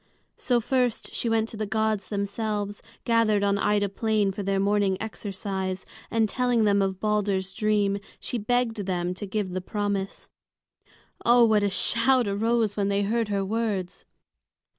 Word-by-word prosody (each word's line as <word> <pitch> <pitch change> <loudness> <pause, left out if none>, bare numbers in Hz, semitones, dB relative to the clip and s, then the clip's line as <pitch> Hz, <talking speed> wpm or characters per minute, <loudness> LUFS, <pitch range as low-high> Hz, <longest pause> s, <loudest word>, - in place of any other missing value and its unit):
So 245 -2 +1
first 250 0 -1
she 235 - -1
went 225 0 +1
to 220 - -7
the 215 0 -2
gods 220 -2 0
themselves, 205 0 -3 0.2
gathered 225 -3 +3
on 200 0 +2
Ida 205 0 +2
Plain 210 0 0
for 195 - -5
their 195 0 0
morning 200 -1 +2
exercise; 190 -3 -4 0.2
and 225 -1 +2
telling 245 +1 +1
them 200 -1 +3
of 190 -1 -1
Balder's 200 -3 0
dream, 205 -2 +1 0.2
she 245 - -3
begged 225 -2 0
them 180 -1 -1
to 200 +3 -7
give 195 -1 -2
the 185 +1 -3
promise. 200 0 -3 1.0
Oh, 240 0 +6
what 215 -2 +3
a 205 - +2
shout 240 +5 +3
arose 220 +1 +1
when 200 -1 0
they 200 0 +1
heard 225 +2 0
her 200 -1 -1
words! 205 -4 -2
205 Hz, 160 wpm, -26 LUFS, 195-225 Hz, 1.0 s, Oh